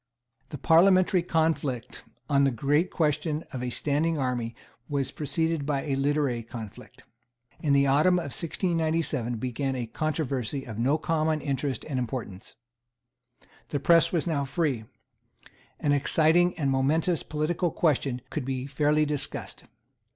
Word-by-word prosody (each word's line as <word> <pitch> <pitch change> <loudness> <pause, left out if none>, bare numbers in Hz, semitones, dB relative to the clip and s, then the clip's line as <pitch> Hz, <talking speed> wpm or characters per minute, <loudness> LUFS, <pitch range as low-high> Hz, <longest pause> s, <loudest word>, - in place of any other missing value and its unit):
The 145 - -6
parliamentary 185 +4 +4
conflict 160 -8 -1 0.2
on 140 -1 +3
the 140 - +4
great 145 +8 +1
question 155 0 0
of 130 - -4
a 125 - -2
standing 155 +5 0
army 125 -4 -2 0.3
was 140 -2 -1
preceded 160 +1 -1
by 140 -1 -1
a 140 - -2
literary 135 -3 0
conflict. 110 -2 -10 0.6
In 150 - 0
the 140 0 +4
autumn 150 +7 +4
of 150 -6 -3
1697 160 -8 -1
began 130 +3 -2
a 125 -2 -2
controversy 135 -1 -2
of 115 -2 -7
no 135 +6 +2
common 155 -1 0
interest 140 -1 -2
and 135 -4 -2
importance. 115 -4 -6 1.1
The 145 - -1
press 165 +3 +4
was 170 -4 0
now 155 -5 0
free. 135 -4 -1 0.9
An 145 - +1
exciting 160 +5 +3
and 140 -4 0
momentous 155 +5 +1
political 165 +4 -1
question 140 -6 0
could 155 - -3
be 130 0 -3
fairly 150 +2 +2
discussed. 150 -2 -3
145 Hz, 135 wpm, -27 LUFS, 130-160 Hz, 1.1 s, parliamentary